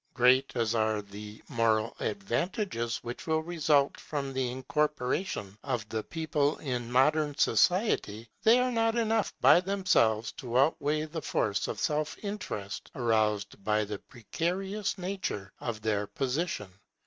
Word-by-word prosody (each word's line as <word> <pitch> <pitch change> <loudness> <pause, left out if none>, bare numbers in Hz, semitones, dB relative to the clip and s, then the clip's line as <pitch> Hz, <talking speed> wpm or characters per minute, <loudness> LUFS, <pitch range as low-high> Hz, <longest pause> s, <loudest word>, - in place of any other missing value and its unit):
Great 130 +2 +4
as 115 -2 +1
are 110 -1 +1
the 105 +1 -10
moral 115 -1 +1
advantages 120 - -2
which 120 +5 -7
will 160 0 +1
result 150 -4 +2
from 140 -3 -4
the 130 -1 0
incorporation 130 - -1
of 110 -2 -2
the 110 - -2
people 155 0 -1
in 125 -4 -3
modern 145 +3 +3
society, 175 - +2
they 225 +2 +6
are 250 0 +1
not 225 -1 +1
enough 225 -2 +1
by - - +8
themselves 185 - +2
to 125 -1 -3
outweigh 150 +2 +2
the 160 +1 -5
force 100 -7 0
of - - -4
self 150 0 -1
interest 185 - -5
aroused 110 -4 0
by 105 +1 +1
the 105 -1 -5
precarious 190 - -3
nature 180 - -4
of 110 -3 -4
their 105 -2 0
position. 135 - -2
130 Hz, 135 wpm, -29 LUFS, 110-170 Hz, -, by